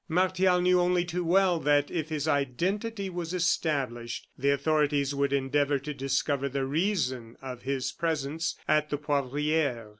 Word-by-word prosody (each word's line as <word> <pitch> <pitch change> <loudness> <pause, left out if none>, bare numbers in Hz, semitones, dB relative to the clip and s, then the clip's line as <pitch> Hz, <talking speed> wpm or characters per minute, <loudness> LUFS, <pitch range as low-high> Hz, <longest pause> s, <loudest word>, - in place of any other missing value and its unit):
Martial 185 +1 +3
knew, 180 0 +4
only 175 0 +2
too 175 +1 -2
well, 180 0 +3
that 145 0 +2
if 160 -3 -2
his 155 -1 -2
identity 190 - -1
was 175 -1 -4
established, 135 -9 -1
the 140 +2 0
authorities 145 0 +1
would 140 0 0
endeavor 140 +1 +1
to 145 +2 -6
discover 135 0 -1
the 135 0 -2
reason 135 - -1
of 130 -2 -7
his 135 -1 -2
presence 160 0 -2
at 150 0 +2
the 145 - -1
Poivriere. 145 -3 -1
145 Hz, 150 wpm, -28 LUFS, 140-175 Hz, -, knew